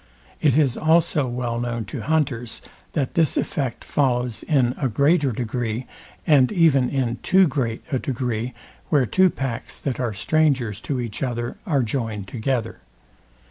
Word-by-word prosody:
It 145 -3 +4
is 140 -6 +2
also 160 -3 +3
well 120 -1 -2
known 120 -2 -3
to 105 - -6
hunters, 135 -7 -1 0.3
that 140 -5 -1
this 165 -3 +2
effect 140 - -2
follows 125 -4 0
in 130 -5 +2
a 135 - +1
greater 140 +4 +3
degree, 120 0 -3 0.4
and 140 -5 +5
even 155 -9 +4
in 125 -4 -1
too 190 0 +5
great 125 -6 -2
a 130 - +1
degree, 120 -2 -3 0.3
where 145 -5 +3
two 185 +9 +4
packs, 135 -7 -4
that 135 -3 -3
are 125 -3 0
strangers 130 -2 +1
to 135 -3 0
each 115 -4 -4
other, 120 -2 -2
are 140 -7 +2
joined 110 -4 -3
together. 115 +1 -2
130 Hz, 150 wpm, -23 LUFS, 120-145 Hz, 0.4 s, and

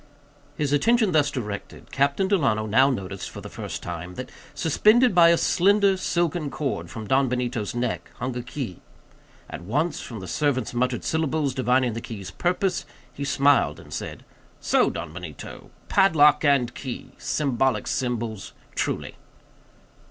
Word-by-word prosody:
His 145 -1 0
attention 225 - +3
thus 150 -3 +3
directed, 105 -8 -6
Captain 140 +7 +1
Delano 135 - +2
now 130 +6 +4
noticed 100 -6 -4
for - - -9
the - - -9
first, - - -6
that, 90 +8 -6 0.2
suspended 215 - +4
by 170 -1 +7
a 170 - +5
slender 200 +3 +3
silken 170 -4 -1
cord, 140 -1 -3
from 115 -4 -7
Don 130 +4 +2
Benito's 120 -3 -2
neck, 120 0 -2
hung 125 0 -4
a 125 - -2
key. 120 - -6 0.7
At - - -7
once, 145 - -1
from 115 -4 -7
the 95 - -8
servant's 130 -4 0
muttered 125 0 0
syllables, 155 -3 0
divining 125 -1 +2
the 115 - -5
key's 100 -6 -7
purpose, 180 +2 0 0.3
he 140 - -5
smiled, 140 0 +3
and - - -12
said:—"So, - - -2
Don 75 - -6
Benito—padlock 150 - +1
and 140 -5 +3
key—significant 130 0 -2
symbols, 115 -5 -3 0.2
truly." - - -3
135 Hz, 135 wpm, -25 LUFS, 120-160 Hz, 0.7 s, by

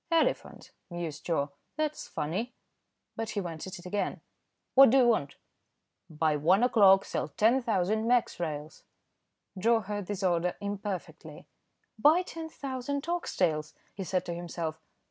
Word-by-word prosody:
"Elephant," 330 -1 0 0.2
mused 170 -4 -6
Joe. 145 -4 0 0.3
"That's 305 -1 -2
funny." 195 +12 -3 0.6
But 225 -1 -3
he 205 - -2
went 170 -3 -5
at 190 0 -7
it 175 - -13
again. 200 +3 -2 0.5
"What 270 -1 +9
do 265 - +4
you 250 -2 +5
want?" 145 -12 +1 0.7
"By 155 -1 +1
one 180 +9 +3
o'clock, 200 -6 +6
sell - - -2
10,000 220 -3 +1
Mex. 245 -5 +2
Rails." 155 -2 -5 0.8
Joe 225 +3 +3
heard 205 -1 -5
this 205 -1 -4
order 175 -1 +1
imperfectly. 200 -2 -6 0.5
"Buy 315 +9 +5
10,000 285 -4 -5
ox 345 0 -2
tails," 155 -4 0 0.2
he 195 - -5
said 185 0 -1
to 170 - -3
himself. 170 -2 -5
195 Hz, 140 wpm, -29 LUFS, 170-240 Hz, 0.8 s, What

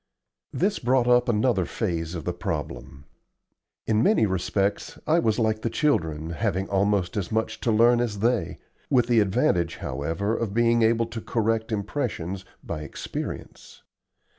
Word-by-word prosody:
This 195 +3 0
brought 125 0 +2
up 125 0 +4
another 110 -3 +2
phase 85 -6 -3
of 80 - -5
the - - -1
problem. 70 +1 -5 0.8
In 110 0 +2
many 205 - +4
respects 95 +1 -1
I 160 +2 +3
was 110 -9 +1
like 110 -2 +1
the 115 - -1
children, 80 - 0
having 95 +1 -1
almost 100 -2 +1
as 95 -4 -3
much 110 0 -1
to 115 - 0
learn 120 +2 +5
as 110 -4 -2
they 115 +2 0 0.3
with 125 -4 +4
the 120 -1 +3
advantage, 90 -4 +1
however, 80 - -2
of 110 -4 -3
being 120 0 +3
able 115 +1 +3
to 115 0 -7
correct 115 0 -1
impressions 100 - -3 0.2
by 80 -2 -5
experience. 75 - -7
110 Hz, 150 wpm, -25 LUFS, 95-120 Hz, 0.8 s, learn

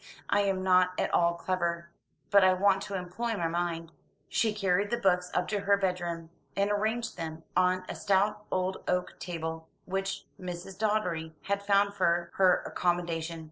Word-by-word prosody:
"I 205 - +4
am 195 -2 +1
not 185 -1 +4
at - - -1
all 170 0 +3
clever; 170 -1 -2 0.4
but 200 -1 +7
I 185 0 +6
want 195 +1 +3
to 200 - -5
employ 205 +5 -3
my 170 -2 0
mind." 165 -1 -2 0.4
She 225 - +2
carried 200 -1 +1
the 235 - 0
books 180 -5 +2
up - - +1
to 210 - 0
her 200 0 +3
bedroom, 175 -4 -2 0.2
and 200 +1 +1
arranged 220 +3 -1
them 160 0 -5
on 185 0 +2
a - - -4
stout 210 +2 +1
old 185 0 0
oak 180 0 -1
table, 160 -2 -5 0.2
which 195 +1 -3
Mrs. 180 +1 -7
Doddery 180 -7 0
had 200 0 -1
found 200 0 +3
for 170 -3 +1
her 185 -2 +4
accommodation. 170 -2 -1
185 Hz, 170 wpm, -29 LUFS, 170-200 Hz, 0.4 s, but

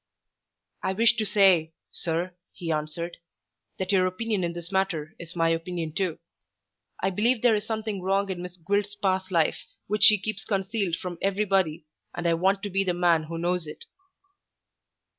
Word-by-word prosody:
"I 190 - -1
wish 230 +3 +4
to 220 - 0
say, 180 -6 +4 0.2
sir," 170 +2 -2 0.2
he 170 -2 -4
answered, 155 +3 -3 0.6
"that 190 0 -2
your 185 -2 +4
opinion 205 +1 -1
in 170 -1 -1
this 175 +1 -7
matter 175 -5 -1
is 170 +1 -9
my 165 -1 +2
opinion 165 0 -2
too. 180 -2 -1 0.9
I 190 - +2
believe 225 +5 +2
there 240 -2 +6
is 210 0 -1
something 220 -3 -3
wrong 195 +2 +1
in 180 -2 -4
Miss 180 0 -8
Gwilt's 200 +4 -1
past 190 -2 0
life 165 -4 +2 0.3
which 210 0 +4
she 210 - +9
keeps 215 +1 -4
concealed 195 -3 -1
from 175 -1 -6
everybody, 190 -5 +1 0.3
and 175 - -4
I 170 - +4
want 190 +4 +1
to 205 - -3
be 195 +1 +2
the 180 -2 0
man 170 -3 +3
who 165 +1 -5
knows 175 -1 -1
it." 150 - -9
185 Hz, 175 wpm, -26 LUFS, 170-200 Hz, 0.9 s, she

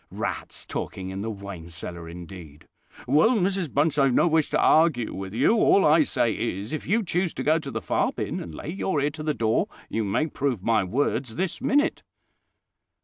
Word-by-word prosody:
Rats - - -4
talking 95 -1 -5
in 95 +1 -5
the 110 - -3
wine 100 -5 -8
cellar 85 0 -7
indeed!" 85 -3 -11 0.4
"Well, 155 - +4
Mrs 190 -5 0
Bunch, 145 +1 +1
I've 135 -3 +3
no - - +4
wish 160 -2 +2
to - - +1
argue 155 -8 +3
with 95 0 -6
you: 120 - +3
all 200 - +4
I 155 +2 +6
say 120 -5 +1
is, 105 +2 -3
if 155 - -4
you 220 +6 +2
choose 180 -1 -1
to - - -3
go 155 +2 +3
to 140 - -7
the 110 -5 -4
far - - +1
bin, - - -4
and 80 -3 -8
lay - - -7
your 185 -2 -1
ear 145 +1 +1
to 155 +1 -9
the 155 -1 -1
door, 110 -1 +1 0.2
you 115 - -1
may 100 +10 0
prove 135 - -2
my 110 -2 +2
words 120 +3 -1
this 185 +3 -2
minute." 290 +4 +2
135 Hz, 205 wpm, -25 LUFS, 100-160 Hz, 0.4 s, I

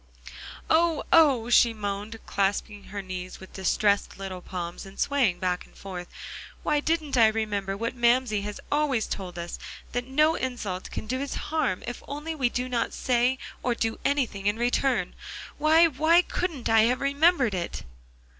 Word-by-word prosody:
"Oh 330 0 +3
oh!" 270 -8 +5
she 235 -1 +5
moaned, 205 +1 -4
clasping 200 +1 -1
her 200 0 -6
knees 185 -1 -6
with 190 - -13
distressed 200 +2 +1
little 190 -2 -6
palms, 175 -1 -6
and 195 0 -12
swaying 260 -11 +2
back 180 0 -1
and - - -24
forth, 180 -3 -7 0.6
"why 300 -1 +2
didn't 310 -3 0
I 225 -2 +7
remember 205 -3 -1
what 230 +2 -2
Mamsie 240 -3 +2
has 210 0 -5
always 285 -6 +1
told 180 -3 -5
us 170 0 -5 0.3
that 245 +1 -2
no 305 +4 +3
insult 235 - -4
can - - -5
do 255 +4 -2
us 280 - -3
harm 310 -13 -1
if 245 - -6
only 295 +3 -4
we 265 -6 +1
do 250 +1 -2
not 245 -2 -1
say 250 +1 +2 0.2
or 245 -1 0
do 225 -1 -2
anything 240 -9 0
in 205 +2 +2
return. 245 +2 +1 0.5
Why 315 +3 +6
why 325 +3 +4
couldn't 330 -11 -3
I 225 -1 +5
have 250 +2 +1
remembered 280 - +3
it?" 175 -2 -4
235 Hz, 165 wpm, -27 LUFS, 200-280 Hz, 0.6 s, I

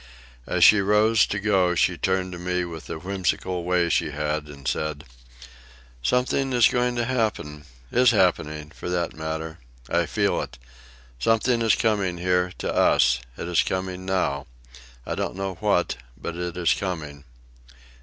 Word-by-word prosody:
As - - +1
she 105 -2 +8
rose 105 +2 +4
to 100 - -2
go 95 -4 +2
she 90 - +2
turned 95 +1 -1
to 90 - -7
me 90 0 -1
with 85 -2 -8
the - - -5
whimsical 90 0 -2
way 90 0 +2
she 85 - +1
had, 75 0 -2
and 70 -2 -10
said: 75 -1 -2 1.0
"Something 125 - +1
is 120 -3 +6
going 125 0 0
to 120 -1 0
happen—is 75 - 0
happening, 75 -6 +1
for 90 - -7
that 85 -1 -1
matter. 80 +1 -5 0.3
I - - +2
feel - - 0
it. 60 - -8 0.6
Something 115 - +2
is 115 -2 +4
coming 100 -6 0
here, 90 0 +1
to - - -3
us. - - +4 0.2
It - - -5
is 90 -2 +3
coming 95 0 -3
now. 90 -7 -1 0.6
I - - -3
don't - - -3
know 95 0 -3
what, 100 -5 +1 0.2
but 85 - -5
it 90 0 -4
is 85 -5 +3
coming." 75 -7 -5
90 Hz, 155 wpm, -24 LUFS, 80-100 Hz, 1.0 s, she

